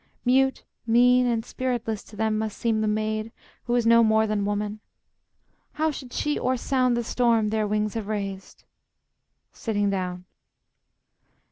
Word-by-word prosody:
Mute, 265 +2 +2 0.2
mean, 250 +2 +5
and 230 -2 0
spiritless 240 -4 -3
to 215 - -14
them 220 +1 0
must 220 -1 -3
seem 225 -2 0
The 215 - 0
maid 215 +1 -1 0.3
who 240 - 0
is 240 -2 +1
no 230 0 +6
more 220 0 +3
than 210 -2 -1
woman. 205 +1 -2 0.9
How 315 +1 0
Should 260 -3 -9
she 295 +3 -1
o'er 255 0 0
sound 255 -1 +1
the 240 - -1
storm 230 -2 +2
their 215 -1 0
wings 210 0 -1
have 225 -3 -4
raised? 195 -3 -5 0.9
[Sitting 205 -3 -1
down. 180 -2 -3
220 Hz, 150 wpm, -25 LUFS, 210-245 Hz, 0.9 s, no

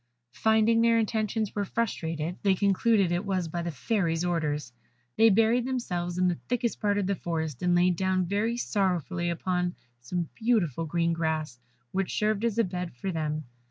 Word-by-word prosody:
Finding 220 +3 +3
their 230 0 +4
intentions 220 -1 -1
were 205 - -1
frustrated, 170 -7 -2
they 195 -2 +3
concluded 200 0 +2
it 175 +2 0
was 190 -4 -1
by 170 +2 -3
the 170 - -3
Fairy's 170 - 0
orders. 150 -7 -1 0.4
They 225 0 +6
buried 225 +4 +3
themselves 180 -9 -2
in 185 0 +3
the 175 -2 -1
thickest 240 -1 0
part 205 -1 +1
of 205 - 0
the 200 - +1
forest, 160 -7 -3
and 180 0 +2
laid 175 0 +3
down 185 0 +1
very 210 +6 0
sorrowfully 180 - 0
upon 180 +1 -1 0.2
some 170 +8 -3
beautiful 190 - 0
green 170 +1 +1
grass, 155 -6 -2 0.3
which 195 -1 -2
served 215 0 +1
as 230 -2 0
a 230 - +4
bed 180 - -4
for 190 +11 -3
them. 155 -2 -2
185 Hz, 175 wpm, -28 LUFS, 170-215 Hz, 0.4 s, They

